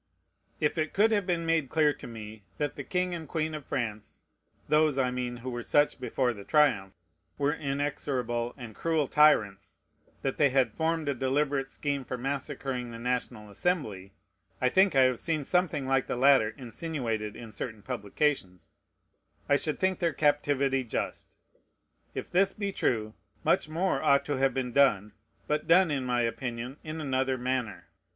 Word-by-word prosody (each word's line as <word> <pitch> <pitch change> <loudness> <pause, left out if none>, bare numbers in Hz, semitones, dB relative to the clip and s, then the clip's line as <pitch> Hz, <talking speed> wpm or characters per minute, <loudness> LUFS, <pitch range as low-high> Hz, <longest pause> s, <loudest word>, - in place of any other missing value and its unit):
If 150 +2 0
it 155 0 -1
could 215 +3 +4
have 205 -3 +1
been 170 -2 0
made 165 -5 +1
clear 150 -2 +3
to - - -10
me 110 -2 -9 0.2
that 145 -2 -2
the - - -6
king 180 -1 -1
and 165 -2 -6
queen 160 -1 -2
of 150 -3 -7
France 110 -4 -4 0.4
(those, 150 -2 +3
I 130 -2 +2
mean, 125 -1 -3
who 125 +2 -6
were 120 0 -4
such 145 +4 +2
before 125 0 0
the 100 -2 -10
triumph) 110 -10 +2 0.4
were 145 +1 +1
inexorable 135 -5 -2
and 120 -4 -8
cruel 160 0 0
tyrants, 110 -11 +3 0.5
that 135 - -1
they 145 -2 +4
had 130 -4 +2
formed 160 -1 -1
a 140 - +2
deliberate 135 +1 0
scheme 140 -1 -2
for 125 - -5
massacring 135 -1 -3
the 115 - -8
National 115 -3 -3
Assembly, 105 - -2 0.5
(I 125 - +3
think 190 +2 +4
I 135 - +6
have 130 -2 +2
seen 155 -3 -1
something 165 -3 0
like 135 -1 +1
the - - -2
latter 130 -3 +5
insinuated 120 -5 -4
in 115 -2 -9
certain 110 0 -6
publications,) 100 - -2 0.8
I 140 - +4
should 150 +1 -1
think 190 0 +1
their 170 -2 +1
captivity 140 -3 +2
just. 120 - -4 0.8
If - - -5
this 195 +2 +3
be 200 -1 -3
true, 110 - -1 0.3
much - - +2
more 165 -3 0
ought 140 0 +3
to 145 -2 -1
have 135 -1 +2
been 130 -2 -2
done, 115 -7 +3 0.3
but 150 0 -1
done, 175 0 +5
in 135 -3 -1
my 125 -1 +1
opinion, 120 +2 -3
in 155 0 -5
another 135 -2 0
manner. 125 -3 -2
135 Hz, 170 wpm, -29 LUFS, 120-155 Hz, 0.8 s, I